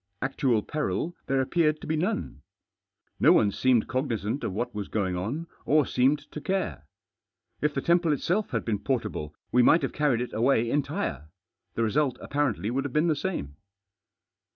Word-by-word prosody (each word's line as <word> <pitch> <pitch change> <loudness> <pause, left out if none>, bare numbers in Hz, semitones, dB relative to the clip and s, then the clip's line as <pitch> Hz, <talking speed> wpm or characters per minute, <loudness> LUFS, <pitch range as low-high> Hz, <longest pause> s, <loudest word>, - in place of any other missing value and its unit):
Actual 130 -4 +1
peril 155 +3 -2
there 135 0 +2
appeared 155 +2 +1
to - - -9
be 160 - 0
none. 175 - -2 0.8
No - - +6
one 100 - +4
seemed 125 +1 +2
cognisant 125 -2 -2
of - - -1
what 110 +6 -3
was 105 -2 -4
going 95 -4 -1
on, 115 - -3 0.2
or 150 -1 +3
seemed 135 +4 +2
to 150 - -6
care. 185 - -2 0.7
If 150 0 0
the 135 - 0
temple 170 -1 +3
itself 190 +9 0
had - - -2
been 105 -3 0
portable, 100 - -3 0.2
we 125 - +5
might 160 +6 +5
have 135 - -2
carried 145 -6 +1
it 125 - -4
away 120 0 +2
entire; 75 - -2 0.5
the 115 - +1
result 130 +4 +1
apparently 140 -7 -1
would 135 +2 0
have 140 - -5
been 155 +3 +3
the 155 - +2
same. 140 - -4
135 Hz, 175 wpm, -27 LUFS, 110-150 Hz, 0.8 s, No